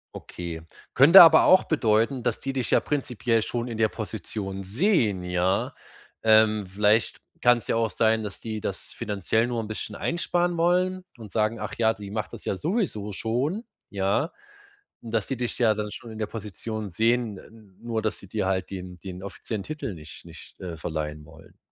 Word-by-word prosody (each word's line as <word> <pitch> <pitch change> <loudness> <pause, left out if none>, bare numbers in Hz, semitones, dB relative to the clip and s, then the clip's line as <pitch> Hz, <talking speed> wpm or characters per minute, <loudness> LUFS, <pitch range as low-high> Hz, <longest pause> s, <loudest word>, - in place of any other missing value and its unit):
Okay, 85 -2 -7 0.3
könnte 165 +8 +10
aber 160 -1 +7
auch 185 - +6
bedeuten, 115 -2 +1
dass 120 -2 -1
die 135 - -4
dich 130 -3 -2
ja - - +5
prinzipiell 120 -5 0
schon 120 +2 -3
in 115 -2 -5
der 110 - +4
Position 100 -2 -5
sehen, 110 - +1
ja? 90 +2 0 0.5
Ähm, 110 -2 +4
vielleicht 105 +3 +2 0.2
kann's 120 -1 +4
ja - - +1
auch 115 -1 +1
sein, 110 0 +2
dass 100 -2 -7
die 110 -2 -5
das 95 - -3 0.2
finanziell 110 +1 0
nur 120 -1 -2
'n 110 - -4
bisschen 110 -1 -5
einsparen 175 +3 0
wollen 180 +2 +1
und 110 -4 -11
sagen: 110 +1 0
„Ach - - -5
ja, 110 -1 +3
die 100 0 -9
macht 105 0 -3
das - - -10
ja - - -1
sowieso 150 - -2
schon.“ 130 - -1 0.3
Ja? 100 - 0 0.7
Und, 115 - -9
dass 110 -3 0
die 135 - -3
dich 120 -1 -3
ja 115 -3 +4
dann 105 0 -4
schon 115 +1 -9
in 110 - -9
der 110 - -2
Position 110 0 -6
sehen. 115 +2 +1
N 105 -2 -17
nur 115 -1 -2
dass 110 0 -2
sie 100 - -13
dir 105 +1 -2
halt 95 0 -1
den 90 -2 -8
den 95 -1 -8
offiziellen 100 +1 -5
Titel 145 -6 -5
nicht 75 -2 -12
nicht, - - -14
äh, 90 -3 -6
verleihen 75 -1 -4
wollen. 80 +1 -17
110 Hz, 190 wpm, -26 LUFS, 100-120 Hz, 0.7 s, könnte